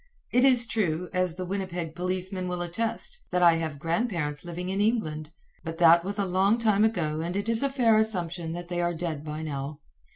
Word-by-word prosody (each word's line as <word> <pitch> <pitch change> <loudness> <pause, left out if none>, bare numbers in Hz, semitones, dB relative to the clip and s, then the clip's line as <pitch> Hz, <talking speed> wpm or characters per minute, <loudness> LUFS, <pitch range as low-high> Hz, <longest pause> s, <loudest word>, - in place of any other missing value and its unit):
It 250 - +4
is 250 -3 +5
true, 180 -6 -1
as 185 -2 +1
the 185 0 -4
Winnipeg 180 -4 -3
policemen 185 +1 -3
will 180 -1 -2
attest, 230 - -2
that 180 0 +1
I 170 -1 +6
have 160 -3 -3
grandparents 165 - -1
living 175 +1 -5
in 195 +1 0
England; 160 -9 -1 0.3
but 165 -1 -5
that 170 0 +6
was 200 +3 -3
a 200 - +1
long 190 +4 +3
time 215 -3 +3
ago 170 -9 0
and 175 +3 -2
it 205 +2 -2
is 230 0 +1
a 275 - +1
fair 235 -5 +4
assumption 175 -6 -2
that 175 0 -6
they 175 0 -2
are 175 0 0
dead 160 -3 -4
by 155 +1 -5
now. 140 -1 -5
180 Hz, 205 wpm, -27 LUFS, 165-205 Hz, 0.3 s, I